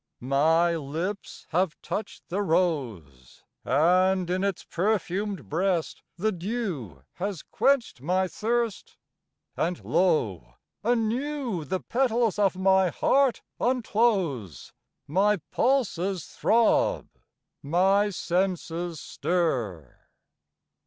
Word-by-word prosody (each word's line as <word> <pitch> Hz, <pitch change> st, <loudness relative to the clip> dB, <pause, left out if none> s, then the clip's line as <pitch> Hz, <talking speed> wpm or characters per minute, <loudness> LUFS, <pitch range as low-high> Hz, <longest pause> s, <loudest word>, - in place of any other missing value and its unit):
My 165 Hz, +4 st, +4 dB
lips 165 Hz, +7 st, -5 dB
have 175 Hz, 0 st, 0 dB
touched 215 Hz, -, -5 dB
the 195 Hz, +4 st, -1 dB
rose, 120 Hz, -, -2 dB, 0.2 s
And 180 Hz, +6 st, +3 dB
in 185 Hz, +1 st, 0 dB
its 200 Hz, -3 st, -1 dB
perfumed 200 Hz, -1 st, -1 dB
breast 175 Hz, +1 st, -1 dB, 0.2 s
the 215 Hz, +5 st, +1 dB
dew 175 Hz, -, -4 dB
Has 190 Hz, -3 st, -3 dB
quenched 270 Hz, -, +1 dB
my 185 Hz, +5 st, +1 dB
thirst; 230 Hz, +1 st, -2 dB, 0.6 s
and 175 Hz, +1 st, -2 dB
lo! 105 Hz, -, +1 dB, 0.3 s
anew 240 Hz, -, -1 dB
The 185 Hz, +6 st, -2 dB
petals 235 Hz, -4 st, +1 dB
of 195 Hz, -3 st, +3 dB
my 190 Hz, 0 st, +3 dB
heart 270 Hz, +7 st, +2 dB, 0.2 s
unclose, 205 Hz, -, 0 dB, 0.3 s
My 200 Hz, +7 st, +2 dB
pulses 195 Hz, -, 0 dB
throb, 235 Hz, -, +2 dB, 0.5 s
my 190 Hz, +7 st, +3 dB
senses 175 Hz, -3 st, -2 dB
stir. 130 Hz, -, -2 dB
185 Hz, 90 wpm, -26 LUFS, 160-210 Hz, 0.6 s, My